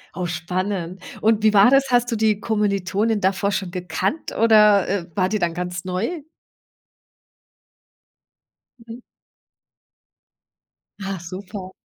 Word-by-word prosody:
Oh, 180 Hz, +1 st, -3 dB
spannend. 180 Hz, +2 st, -3 dB, 0.2 s
Und 220 Hz, -1 st, +2 dB
wie 215 Hz, -1 st, +4 dB
war 200 Hz, +3 st, +7 dB
das? 275 Hz, 0 st, +3 dB
Hast 245 Hz, 0 st, +2 dB
du -, -, 0 dB
die 215 Hz, -2 st, +1 dB
Kommilitonin 210 Hz, 0 st, 0 dB
davor 195 Hz, +1 st, +1 dB
schon 190 Hz, -2 st, -2 dB
gekannt 180 Hz, -, -3 dB
oder, 210 Hz, -3 st, +5 dB
äh, 195 Hz, -3 st, -1 dB
war 185 Hz, -2 st, +1 dB
die 215 Hz, -, 0 dB
dann 175 Hz, -4 st, -1 dB
ganz 180 Hz, +1 st, -5 dB
neu? 220 Hz, -, -3 dB, 2.6 s
Mhm. 230 Hz, +1 st, -9 dB, 2.0 s
Ach, 195 Hz, -1 st, -4 dB
super. 185 Hz, +2 st, -8 dB
200 Hz, 115 wpm, -21 LUFS, 185-215 Hz, 2.6 s, war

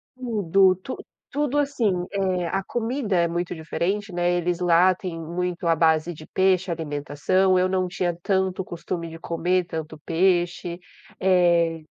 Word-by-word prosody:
Tudo, 195 Hz, -6 st, +3 dB
tu 225 Hz, +7 st, -7 dB, 0.3 s
tudo 290 Hz, 0 st, 0 dB
assim, 275 Hz, -8 st, +1 dB, 0.2 s
eh, 185 Hz, -3 st, 0 dB
a 195 Hz, +3 st, -1 dB
comida 235 Hz, -2 st, -2 dB
é 170 Hz, -1 st, +3 dB
muito 175 Hz, +1 st, -3 dB
diferente, 190 Hz, +5 st, -2 dB
né, 175 Hz, 0 st, +1 dB
eles 175 Hz, 0 st, 0 dB
lá 180 Hz, +1 st, +5 dB
têm 175 Hz, -2 st, -6 dB
muito 175 Hz, +1 st, -3 dB
à 165 Hz, -1 st, +4 dB
base 160 Hz, +1 st, +2 dB
de 155 Hz, 0 st, -12 dB
peixe 190 Hz, -1 st, +2 dB
a 170 Hz, -, 0 dB
alimentação, 160 Hz, +5 st, +1 dB
eu 185 Hz, 0 st, +3 dB
não 185 Hz, -1 st, 0 dB
tinha 180 Hz, -2 st, -2 dB
tanto 190 Hz, -1 st, 0 dB
costume 170 Hz, -1 st, -5 dB
de 165 Hz, -, -9 dB
comer 175 Hz, +2 st, 0 dB
tanto 160 Hz, -2 st, -6 dB
peixe. 175 Hz, 0 st, +1 dB, 0.4 s
Eh, 170 Hz, -3 st, +3 dB
180 Hz, 155 wpm, -24 LUFS, 170-190 Hz, 0.4 s, lá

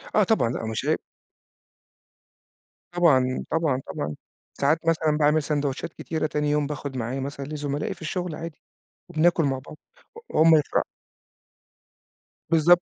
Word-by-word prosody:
آه 210 Hz, -, +6 dB
طبعًا، 190 Hz, -, +2 dB
لأ 115 Hz, -, -3 dB
مش 110 Hz, 0 st, -3 dB
عيب. -, -, +2 dB, 1.9 s
طبعًا، 130 Hz, -8 st, +3 dB
طبعًا، 155 Hz, -5 st, +1 dB
طبعًا. 75 Hz, +1 st, -4 dB, 0.4 s
ساعات 155 Hz, +4 st, +1 dB
مثلًا 155 Hz, -2 st, +2 dB
باعمل 150 Hz, +1 st, +3 dB
ساندويتشات 145 Hz, 0 st, -2 dB
كتيرة 160 Hz, -1 st, -2 dB
تاني 150 Hz, 0 st, 0 dB
يوم 150 Hz, -1 st, +1 dB
باخُد 140 Hz, -2 st, -5 dB
معايا 125 Hz, +3 st, -2 dB
مثلًا 140 Hz, 0 st, -5 dB
لزملائي 145 Hz, -1 st, -3 dB
في 175 Hz, -, -20 dB
الشغل 175 Hz, 0 st, -3 dB
عادي، 165 Hz, -1 st, -8 dB, 0.5 s
وبناكُل 170 Hz, 0 st, +3 dB
مع 135 Hz, -2 st, 0 dB
بعض -, -, -10 dB, 0.4 s
و 460 Hz, -, -10 dB, 0.2 s
وهُم 160 Hz, 0 st, +7 dB
يفرحوا. 150 Hz, -, +1 dB, 1.7 s
بالضبط. 170 Hz, +2 st, +5 dB
150 Hz, 135 wpm, -25 LUFS, 140-165 Hz, 1.9 s, وهُم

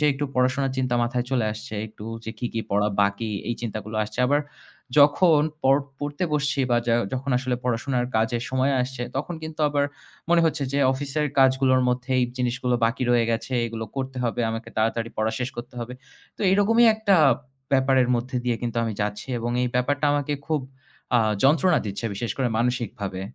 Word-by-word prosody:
যে -, -, +1 dB
একটু 140 Hz, +2 st, -3 dB
পড়াশোনার 130 Hz, +1 st, +1 dB
চিন্তা 125 Hz, -2 st, 0 dB
মাথায় 120 Hz, +1 st, -1 dB
চলে 125 Hz, -4 st, +1 dB
আসছে, 110 Hz, 0 st, -8 dB
একটু 105 Hz, -1 st, -12 dB, 0.2 s
যে 110 Hz, -, -4 dB
কি, 120 Hz, -, -2 dB
কি, 115 Hz, -, -1 dB
পড়া 105 Hz, +1 st, +2 dB
বাকি 100 Hz, +2 st, -1 dB, 0.2 s
এই 120 Hz, -, 0 dB
চিন্তাগুলো 110 Hz, -2 st, -5 dB
আসছে। 105 Hz, +3 st, -7 dB
আবার 145 Hz, +3 st, +3 dB, 0.6 s
যখন 150 Hz, +2 st, +6 dB, 0.2 s
পর 135 Hz, +1 st, +5 dB, 0.2 s
পড়তে 145 Hz, +4 st, -3 dB
বসছি 145 Hz, -1 st, +1 dB
বা 120 Hz, -, +4 dB
যা 115 Hz, -, +3 dB, 0.2 s
যখন 130 Hz, +2 st, -2 dB
আসলে 125 Hz, -1 st, -1 dB
পড়াশোনার 125 Hz, +1 st, 0 dB
কাজের 115 Hz, +1 st, +1 dB
সময় 130 Hz, +2 st, +1 dB
আসছে 130 Hz, 0 st, -5 dB
তখন 150 Hz, +6 st, -3 dB
কিন্তু 160 Hz, 0 st, -7 dB
আবার 145 Hz, -1 st, +1 dB, 0.5 s
মনে 170 Hz, 0 st, +5 dB
হচ্ছে 155 Hz, -3 st, 0 dB
যে 140 Hz, -, +1 dB
office 135 Hz, +1 st, -5 dB
এর 150 Hz, -, +1 dB
কাজগুলোর 130 Hz, -1 st, +4 dB
মধ্যে 125 Hz, +1 st, -2 dB
এই 125 Hz, -, +3 dB
জিনিসগুলো 125 Hz, 0 st, 0 dB
বাকি 115 Hz, +3 st, 0 dB
রয়ে 120 Hz, -1 st, +4 dB
গেছে, 115 Hz, +3 st, -2 dB
এগুলো 115 Hz, -1 st, -5 dB
করতে 130 Hz, -1 st, -4 dB
হবে, 120 Hz, 0 st, -1 dB
আমাকে 115 Hz, +1 st, -5 dB
তাড়াতাড়ি 115 Hz, +1 st, 0 dB
পড়া 110 Hz, +1 st, +1 dB
শেষ 125 Hz, 0 st, -2 dB
করতে 120 Hz, +2 st, -8 dB
হবে। 120 Hz, +1 st, -6 dB, 0.4 s
তো -, -, -16 dB
এরকমই 225 Hz, +4 st, +5 dB
একটা 220 Hz, -3 st, +3 dB, 0.6 s
ব্যাপারের 130 Hz, -2 st, +3 dB
মধ্যে 125 Hz, +2 st, -2 dB
দিয়ে 120 Hz, -2 st, +1 dB
কিন্তু 120 Hz, -1 st, -3 dB
আমি 115 Hz, -, -2 dB
যাচ্ছি 105 Hz, +3 st, -3 dB
এবং 120 Hz, +1 st, -2 dB
এই 125 Hz, -, +1 dB
ব্যাপারটা 145 Hz, +4 st, +1 dB
আমাকে 145 Hz, 0 st, 0 dB
খুব 155 Hz, -2 st, 0 dB, 0.6 s
আ -, -, +5 dB, 0.2 s
যন্ত্রণা 160 Hz, +5 st, +4 dB
দিচ্ছে 100 Hz, +3 st, -5 dB
বিশেষ 115 Hz, +4 st, -3 dB
করে 130 Hz, -2 st, +1 dB
মানসিকভাবে। 115 Hz, -6 st, -2 dB
125 Hz, 190 wpm, -24 LUFS, 115-140 Hz, 0.6 s, যখন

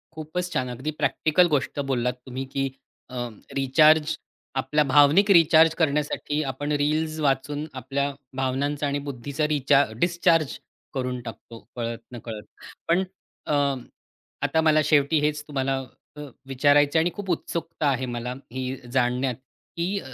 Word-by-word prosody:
खूपच 165 Hz, +3 st, -4 dB
छान. 125 Hz, -1 st, -1 dB
अगदी 130 Hz, +5 st, -4 dB
प्रॅक्टिकल 170 Hz, +3 st, +3 dB
गोष्ट 140 Hz, +1 st, -2 dB
बोललात 125 Hz, -1 st, 0 dB
तुम्ही, 130 Hz, +1 st, -5 dB
की 135 Hz, +1 st, -2 dB, 0.4 s
अ, 130 Hz, -, -9 dB, 0.4 s
रिचार्ज, 150 Hz, +3 st, +4 dB, 0.4 s
आपल्या 135 Hz, +3 st, +2 dB
भावनिक 150 Hz, +9 st, +6 dB
रिचार्ज 165 Hz, -2 st, +6 dB
करण्यासाठी 150 Hz, -1 st, 0 dB
आपण 145 Hz, +3 st, -4 dB
रील्स 155 Hz, +2 st, 0 dB
वाचून 145 Hz, +1 st, 0 dB
आपल्या 135 Hz, +2 st, -2 dB, 0.3 s
भावनांचा 140 Hz, +3 st, -1 dB
आणि 140 Hz, 0 st, -1 dB
बुद्धीचा 140 Hz, +3 st, -2 dB
रिचार्ज 140 Hz, -5 st, +2 dB
डिस्चार्ज 170 Hz, -3 st, +2 dB, 0.4 s
करून 125 Hz, -2 st, -2 dB
टाकतो 115 Hz, 0 st, -10 dB, 0.2 s
कळत 115 Hz, -1 st, -3 dB
नकळत. 115 Hz, -3 st, -7 dB, 0.4 s
पण 175 Hz, +3 st, +3 dB, 0.4 s
अ, -, -, -1 dB, 0.9 s
आता 160 Hz, -, +2 dB
मला 155 Hz, -1 st, +4 dB
शेवटी 150 Hz, +1 st, +3 dB
हेच 150 Hz, 0 st, 0 dB
तुम्हाला 135 Hz, -2 st, -1 dB, 0.4 s
अ, 150 Hz, -, -8 dB, 0.3 s
विचारायचं 145 Hz, +3 st, +4 dB
आहे -, -, +3 dB
आणि 175 Hz, -, 0 dB
खूप 205 Hz, -2 st, -6 dB
उत्सुकता 165 Hz, -2 st, -2 dB
आहे 130 Hz, -1 st, 0 dB
मला 120 Hz, +1 st, -3 dB, 0.2 s
ही 130 Hz, +1 st, -3 dB, 0.2 s
जाणण्यात, 125 Hz, 0 st, +1 dB, 0.4 s
की 185 Hz, +4 st, -1 dB
145 Hz, 135 wpm, -25 LUFS, 130-155 Hz, 0.9 s, भावनिक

